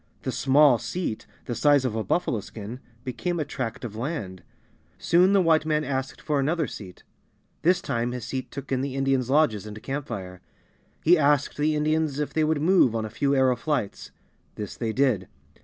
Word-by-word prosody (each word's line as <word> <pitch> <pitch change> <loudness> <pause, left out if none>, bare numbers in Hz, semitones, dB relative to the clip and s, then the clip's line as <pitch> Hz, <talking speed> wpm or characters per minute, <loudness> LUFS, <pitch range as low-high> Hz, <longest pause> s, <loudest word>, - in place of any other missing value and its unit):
The - - -2
"small 135 -2 +4
seat," 175 -9 -4 0.2
the 120 - -3
size 145 +1 +3
of 125 - -1
a 110 - -1
buffalo 120 - 0
skin, 110 +4 -8 0.2
became 170 +7 -3
a 155 - -1
tract 125 -5 -4
of 110 -3 -7
land. 110 - -4 0.6
Soon 180 +3 +4
the 200 -1 +5
White 160 -2 +4
man 155 -1 0
asked 135 -2 -3
for 150 -2 0
another 160 +4 +1
seat. 95 -6 -10 0.6
This 180 +2 +3
time 120 -7 -1
his 125 -2 -5
seat 130 +2 -4
took 140 0 -8
in 130 -1 +1
the 135 -1 -3
Indians' 135 -2 +1
lodges 130 -8 +2
and 105 0 -9
camp 140 +1 -4
fire. 90 -5 -7 0.6
He 170 +1 +5
asked 145 -1 +2
the 150 +1 +1
Indians 155 -1 0
if 150 -1 -2
they 160 - +2
would 155 -1 +1
move 170 - +4
on 110 -1 -1
a 110 - -7
few 140 +4 +1
arrow 130 -1 +3
flights. 125 -5 -3 0.5
This 105 -2 -6
they 115 -2 -2
did. 120 -7 +1
135 Hz, 190 wpm, -25 LUFS, 115-155 Hz, 0.6 s, the